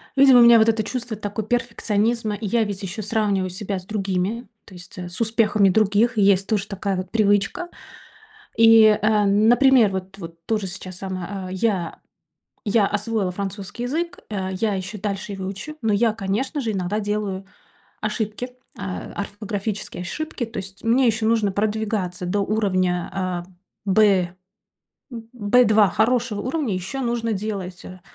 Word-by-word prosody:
Видимо 270 Hz, -2 st, +7 dB
у -, -, +8 dB
меня 235 Hz, -1 st, +8 dB
вот 220 Hz, -, +4 dB
это 220 Hz, -1 st, +1 dB
чувство 240 Hz, -2 st, -4 dB
такой 205 Hz, 0 st, -4 dB
перфекционизма. 230 Hz, -2 st, 0 dB
Я 225 Hz, +1 st, +1 dB
ведь 200 Hz, -2 st, -5 dB
ещё 195 Hz, +3 st, -5 dB
сравниваю 205 Hz, -3 st, 0 dB
себя 195 Hz, +1 st, -4 dB
с 180 Hz, -, -13 dB
другими, 200 Hz, +3 st, -2 dB, 0.2 s
то 190 Hz, -, -15 dB
есть, 180 Hz, +1 st, -12 dB
э, 175 Hz, 0 st, -6 dB
с 175 Hz, -, -7 dB
успехами 215 Hz, -3 st, +3 dB
других. 215 Hz, +4 st, +2 dB
Есть 195 Hz, -1 st, +4 dB
тож 205 Hz, -3 st, 0 dB
такая 195 Hz, -1 st, -2 dB
вот 185 Hz, 0 st, -4 dB
привычка. 205 Hz, -, +1 dB, 0.9 s
И, 225 Hz, 0 st, +8 dB, 0.2 s
эм, 210 Hz, 0 st, +3 dB
например, 245 Hz, -2 st, +5 dB
вот 190 Hz, +1 st, -5 dB
вот 165 Hz, -2 st, -10 dB
тоже 215 Hz, -3 st, -1 dB
сейчас 185 Hz, 0 st, -8 dB
сама, 190 Hz, 0 st, -5 dB
а, -, -, -7 dB
я 190 Hz, -3 st, -1 dB, 0.7 s
я 205 Hz, -1 st, +3 dB
освоила 210 Hz, -2 st, -1 dB
французский 200 Hz, +4 st, -5 dB
язык, 330 Hz, +7 st, -2 dB
э, 190 Hz, -3 st, -3 dB
я 215 Hz, -3 st, +1 dB
ещё 190 Hz, +3 st, -5 dB
дальше 205 Hz, +1 st, -4 dB
его 190 Hz, -1 st, -5 dB
учу. 200 Hz, +11 st, -7 dB
Но 220 Hz, -2 st, +1 dB
я 220 Hz, +2 st, +3 dB
конечно 225 Hz, +8 st, -2 dB
же, 230 Hz, -5 st, -2 dB
иногда 195 Hz, +2 st, -2 dB
делаю 205 Hz, -2 st, -2 dB, 0.6 s
ошибки, 215 Hz, +3 st, -3 dB, 0.3 s
э, 195 Hz, -2 st, -5 dB
орфографические 205 Hz, -1 st, -4 dB
ошибки. 250 Hz, -, -4 dB
То 230 Hz, -, -11 dB
есть 195 Hz, 0 st, -8 dB
мне 240 Hz, +3 st, +3 dB
ещё 220 Hz, -1 st, +1 dB
нужно 220 Hz, -3 st, +2 dB
продвигаться 205 Hz, -3 st, -2 dB
до 200 Hz, +3 st, 0 dB
уровня, 185 Hz, -4 st, 0 dB
а, 185 Hz, -2 st, -3 dB, 0.4 s
Б, 190 Hz, -3 st, +3 dB, 0.8 s
м, 240 Hz, -, -6 dB
м, 225 Hz, 0 st, -11 dB
Б2, 215 Hz, -2 st, +4 dB
хорошего 225 Hz, -1 st, +1 dB
уровня. 255 Hz, -, -1 dB
Ещё 190 Hz, +9 st, -4 dB
нужно 235 Hz, -2 st, -1 dB
делать, 190 Hz, -3 st, -5 dB
э, 185 Hz, 0 st, -11 dB
205 Hz, 160 wpm, -22 LUFS, 190-225 Hz, 0.9 s, у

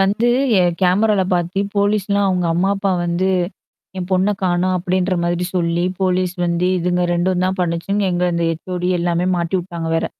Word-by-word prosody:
வந்து 205 Hz, +5 st, +2 dB, 0.3 s
என் 175 Hz, -1 st, +1 dB
கேமரால 200 Hz, +2 st, +3 dB
பாத்து 175 Hz, +2 st, 0 dB, 0.2 s
போலீஸ்லாம் 200 Hz, -1 st, +1 dB
அங்க 180 Hz, -2 st, 0 dB
அம்மா 180 Hz, +3 st, +1 dB
அப்பா 195 Hz, 0 st, -1 dB
வந்து 175 Hz, +2 st, 0 dB, 0.7 s
என் 180 Hz, -1 st, -4 dB
பொண்ண 185 Hz, +2 st, +2 dB
காணும் 185 Hz, 0 st, +1 dB
அப்டின்ற 185 Hz, +1 st, 0 dB
மாதிரி 175 Hz, +1 st, -1 dB
சொல்லி 170 Hz, -1 st, 0 dB, 0.2 s
போலீஸ் 185 Hz, -1 st, +1 dB
வந்து 170 Hz, +1 st, 0 dB
இதுங்க 180 Hz, +1 st, 0 dB
2ம் 180 Hz, +1 st, 0 dB
தான் 190 Hz, +1 st, -1 dB
பண்ணுச்சுங்க 180 Hz, +4 st, -1 dB
எங்க 175 Hz, 0 st, 0 dB
இந்த 170 Hz, 0 st, 0 dB
ஹெச்ஓடி 180 Hz, +2 st, -3 dB
எல்லாமே 175 Hz, 0 st, 0 dB
மாட்டிவுட்டாங்க 170 Hz, -1 st, -3 dB
வேற. -, -, 0 dB
180 Hz, 160 wpm, -19 LUFS, 175-190 Hz, 0.7 s, கேமரால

